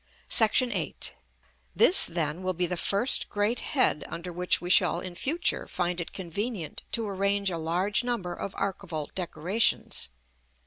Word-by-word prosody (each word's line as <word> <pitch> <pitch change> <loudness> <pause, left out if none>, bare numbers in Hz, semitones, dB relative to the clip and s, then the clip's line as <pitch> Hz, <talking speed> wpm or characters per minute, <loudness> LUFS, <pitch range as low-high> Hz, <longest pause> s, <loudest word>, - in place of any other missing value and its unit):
[Illustration: 235 +3 +4
Fig. - - 0
LXX.] - - -3
§ - - -21
VIII. - - -2 0.6
This, 365 - +8
then, 165 0 -1
will 185 -1 -2
be 180 +1 0
the 180 +1 -3
first 200 +8 +2
great 210 +4 0
head 260 - +1
under 170 +1 -7
which 180 +1 +1
we 175 0 -4
shall - - +3
in 185 -1 -7
future 315 - 0
find 175 -1 -2
it 170 - -7
convenient 190 -1 -5
to 225 -2 -1
arrange 200 0 0
a 170 - -3
large 180 +8 0
number 235 -8 -3
of 195 - -7
archivolt 175 -6 -4
decorations. 185 - 0
185 Hz, 170 wpm, -27 LUFS, 175-210 Hz, 0.6 s, This